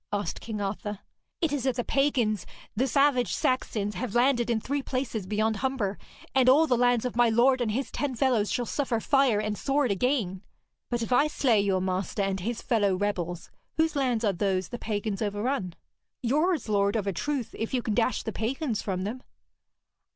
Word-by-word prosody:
asked 205 Hz, -5 st, -2 dB
King 220 Hz, -2 st, -5 dB
Arthur. 205 Hz, +1 st, -3 dB, 0.4 s
'It 320 Hz, -4 st, +1 dB
is 275 Hz, -3 st, -1 dB
that 260 Hz, -2 st, +1 dB
the 245 Hz, -, -1 dB
pagans, 250 Hz, -8 st, +1 dB, 0.3 s
the 255 Hz, +5 st, +1 dB
savage 275 Hz, -1 st, +2 dB
Saxons, 210 Hz, -5 st, 0 dB
have 225 Hz, +3 st, -4 dB
landed 240 Hz, -1 st, +3 dB
in 230 Hz, -2 st, +2 dB
three 280 Hz, +5 st, -2 dB
places 255 Hz, -7 st, -3 dB
beyond 215 Hz, +2 st, 0 dB
Humber, 235 Hz, -6 st, -1 dB, 0.3 s
and 260 Hz, -1 st, +5 dB
all 295 Hz, +5 st, +6 dB
the 255 Hz, -, +2 dB
lands 245 Hz, -1 st, +2 dB
of 250 Hz, -, -3 dB
my 240 Hz, -1 st, +4 dB
lord 250 Hz, +3 st, +4 dB
and 235 Hz, -, 0 dB
his 260 Hz, +5 st, -2 dB
ten 280 Hz, -3 st, -2 dB
fellows 240 Hz, -5 st, +2 dB
shall 245 Hz, -, 0 dB
suffer 255 Hz, -3 st, -1 dB
fire 270 Hz, -3 st, +3 dB
and 210 Hz, 0 st, -1 dB
sword 275 Hz, 0 st, +1 dB
again.' 200 Hz, -4 st, 0 dB, 0.5 s
'But 240 Hz, -1 st, -1 dB
if 240 Hz, -, -1 dB
I 285 Hz, +4 st, +5 dB
slay 245 Hz, -8 st, +2 dB
your 195 Hz, -2 st, +1 dB
master 190 Hz, +2 st, -1 dB
and 195 Hz, -1 st, -1 dB
his 230 Hz, +5 st, -4 dB
fellow 205 Hz, -5 st, +2 dB
rebels, 180 Hz, -3 st, -3 dB, 0.3 s
whose 320 Hz, -1 st, +2 dB
lands 250 Hz, -5 st, +1 dB
are 200 Hz, -, +2 dB
those 190 Hz, 0 st, -1 dB
the 240 Hz, -, -6 dB
pagans 210 Hz, -1 st, -3 dB
overrun?' 205 Hz, -2 st, -2 dB, 0.5 s
'Yours, 305 Hz, +4 st, +1 dB
lord, 200 Hz, -1 st, +2 dB
of 215 Hz, -3 st, 0 dB
a 195 Hz, -, -1 dB
truth, 265 Hz, -1 st, -3 dB
if 225 Hz, -, -2 dB
you 250 Hz, -2 st, 0 dB
can 220 Hz, -, -1 dB
dash 245 Hz, +3 st, +1 dB
the 220 Hz, -, -3 dB
pagans 235 Hz, +2 st, -2 dB
from 185 Hz, -2 st, -2 dB
them.' 230 Hz, +6 st, -4 dB
230 Hz, 195 wpm, -27 LUFS, 205-260 Hz, 0.5 s, all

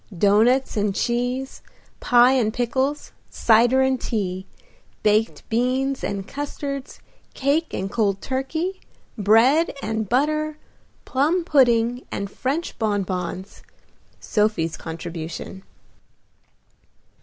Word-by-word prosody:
Doughnuts 220 Hz, +8 st, +3 dB
and 205 Hz, -1 st, 0 dB
cheese, 245 Hz, +2 st, -2 dB, 0.4 s
pie 245 Hz, +1 st, +5 dB
and 245 Hz, -5 st, +2 dB
pickles, 260 Hz, +5 st, -1 dB, 0.2 s
cider 240 Hz, +3 st, +4 dB
and 265 Hz, -1 st, +1 dB
tea, 190 Hz, -4 st, -3 dB, 0.6 s
baked 215 Hz, +2 st, +1 dB
beans 260 Hz, +4 st, 0 dB
and 195 Hz, -1 st, -3 dB
custards, 280 Hz, -1 st, -5 dB, 0.3 s
cake 290 Hz, +4 st, 0 dB
and 195 Hz, +1 st, -4 dB
cold 200 Hz, -4 st, +1 dB
turkey, 315 Hz, -, -3 dB, 0.3 s
bread 235 Hz, -, +4 dB
and 220 Hz, -4 st, -3 dB
butter, 305 Hz, +4 st, +1 dB, 0.5 s
plum 310 Hz, +7 st, +1 dB
pudding 245 Hz, -5 st, +2 dB
and 200 Hz, 0 st, -4 dB
French 285 Hz, +10 st, -3 dB
bonbons, 190 Hz, -3 st, -3 dB, 0.6 s
Sophie's 210 Hz, -7 st, 0 dB
contribution. 165 Hz, +2 st, -7 dB
240 Hz, 95 wpm, -23 LUFS, 205-270 Hz, 0.6 s, pie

